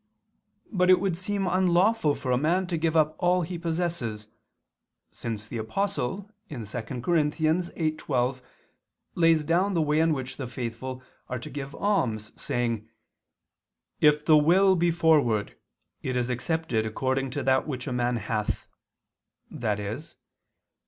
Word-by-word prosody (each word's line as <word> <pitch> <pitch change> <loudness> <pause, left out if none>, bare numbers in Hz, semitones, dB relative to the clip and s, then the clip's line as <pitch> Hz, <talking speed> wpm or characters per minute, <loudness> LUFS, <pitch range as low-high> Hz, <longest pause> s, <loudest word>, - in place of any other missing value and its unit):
But 180 -4 +2
it 185 - +7
would 195 -4 0
seem 200 +2 -2
to 185 - 0
be - - +1
unlawful 185 -2 +3
for 130 - -3
a - - +4
man 170 +7 +1
to 175 -1 -2
give 165 0 +1
up 155 0 +3
all 180 0 +3
he 170 +1 -5
possesses; 160 -11 -2 0.8
since 110 -2 -4
the 120 - -5
Apostle 195 - -2 0.2
(2 150 - -6
Cor. 120 - -2
8:12) 155 -4 0 0.7
lays 165 -2 +4
down 180 +5 +1
the 165 - +3
way 150 +1 +2
in 165 0 +3
which 130 -3 -3
the 130 - -4
faithful 125 +2 -5 0.3
are 125 - -2
to 120 - -8
give 140 0 -6
alms 115 - 0
saying: 115 -3 -2 1.1
"If 150 0 +4
the 155 -1 +7
will 190 +5 +5
be 175 0 +2
forward, 150 - +2 0.5
it 130 - -3
is 125 0 0
accepted 125 -2 -1
according 130 +4 -1
to 140 - -1
that 130 +2 +2
which 130 -4 -4
a 130 - -3
man 125 0 0
hath," 105 -1 -2 0.9
i.e. 105 -1 -2
150 Hz, 145 wpm, -27 LUFS, 120-170 Hz, 1.1 s, it